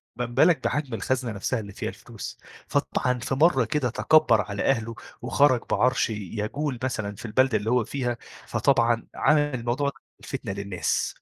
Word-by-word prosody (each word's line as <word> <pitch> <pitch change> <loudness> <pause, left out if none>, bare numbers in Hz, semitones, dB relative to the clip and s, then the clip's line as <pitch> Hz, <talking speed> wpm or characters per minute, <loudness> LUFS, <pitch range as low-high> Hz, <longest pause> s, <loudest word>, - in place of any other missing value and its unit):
ما 125 - -2
بالك 140 +8 +3
بحجم 140 -5 -1
الخزنة 125 0 -1
نَفْسها 110 +4 -2
اللي 100 -2 -8
فيها - - -4
الفلوس، - - -9 0.3
فطبعًا 125 -1 0
في 135 - -2
مَرّة 135 -4 +4
كده 125 +1 0
تكبّر 140 -2 +4
على 100 -1 -4
أهله، 115 -3 0 0.3
وخرَج 130 0 +3
بعَرش 125 -1 +2
ي - - -2
يجول 110 - -3
مثلًا 105 -5 -2
في 110 - -9
البلدة 120 +1 +3
اللي 105 +1 -3
هو 125 -2 +3
فيها، 125 -2 -2 0.3
فطبعًا 115 -1 +2
عمل 150 0 +4
الموضوع 130 0 -1
ده 140 - -11 0.2
الفتنة 130 -6 -5
للناس. 100 -2 -2
120 Hz, 165 wpm, -26 LUFS, 110-135 Hz, 0.3 s, مَرّة